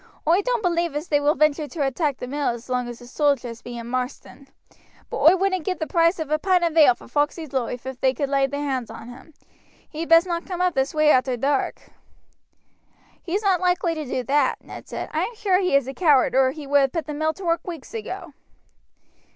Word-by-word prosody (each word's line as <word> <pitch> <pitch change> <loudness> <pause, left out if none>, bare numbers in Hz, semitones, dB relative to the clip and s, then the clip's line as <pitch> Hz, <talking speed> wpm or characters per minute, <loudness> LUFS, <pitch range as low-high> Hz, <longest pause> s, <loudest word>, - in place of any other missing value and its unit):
Oi 345 +5 +4
doan't - - -1
believe 340 -3 0
as 300 +4 -4
they 290 - +3
will 290 +1 +2
venture 305 0 +2
to 295 -2 -2
attack 275 0 -1
the - - -6
mill 285 +3 -2
as 235 +2 -6
long 250 -1 -1
as 240 -1 -7
the 245 - -13
sojers 250 -3 -1
be 245 -1 -8
in 235 - -7
Marsden; 255 +3 -5 0.6
but - - -3
oi 330 +4 +7
wouldn't 375 -2 0
give 365 +3 -2
the 315 - -3
price 335 +1 +2
of 315 -3 -5
a 305 - +2
pint 365 0 +2
of 335 -2 0
ale 290 -7 +6
for - - -15
Foxey's 295 0 -1
loife 250 -1 -3
ef 265 -1 -7
they 265 - +4
could 280 +2 -2
lay 275 0 +2
their 285 +2 -4
hands 260 -4 -2
on 230 - -10
him. 265 +5 -14 0.5
He'd 325 +1 -6
best 330 +1 +7
not 340 -1 -3
come 360 -2 -4
up 360 -1 +2
this 270 +1 -1
way 305 0 +5
arter 255 -2 +2
dark." 275 +3 -1 1.3
"He's 390 +5 -2
not 380 -3 +2
likely 360 -1 +1
to 310 -1 -4
do 255 -1 -3
that," 280 +2 +1
Ned - - -11
said. - - -5
"I - - 0
am 475 - -3
sure 390 -4 +2
he 365 -6 +1
is 275 -2 +2
a 270 - -5
coward 290 -5 +3
or 260 0 +4
he 295 +2 -7
would 285 +1 +3
have 270 -1 +1
put 330 - -2
the 300 - -5
mill 315 +2 0
to 390 - -9
work 335 +1 0
weeks 335 - -8
ago." 450 -2 -6
300 Hz, 235 wpm, -23 LUFS, 265-340 Hz, 1.3 s, oi